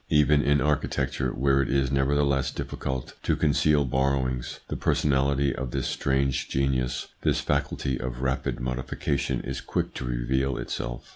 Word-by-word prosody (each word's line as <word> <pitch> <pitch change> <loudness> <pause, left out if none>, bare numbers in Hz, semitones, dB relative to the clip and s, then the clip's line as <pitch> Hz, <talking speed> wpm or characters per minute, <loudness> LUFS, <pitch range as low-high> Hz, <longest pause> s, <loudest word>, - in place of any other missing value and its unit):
Even 75 -1 +4
in 70 -1 +3
architecture, 70 -3 0
where 70 +2 +2
it 65 - -1
is 70 -1 +1
nevertheless 70 0 +2
difficult 65 -2 -4
to - - +1
conceal 75 -1 +3
borrowings, 65 -1 0
the - - -3
personality 70 -1 +2
of 65 -1 -3
this 65 0 -2
strange 65 -1 0
genius, 65 -2 0
this - - +2
faculty 65 -2 -1
of 65 0 -4
rapid 65 -1 -1
modification 65 +1 -2
is 65 0 -4
quick - - -2
to - - -5
reveal 65 +2 0
itself. - - -4
65 Hz, 145 wpm, -26 LUFS, 65-70 Hz, -, Even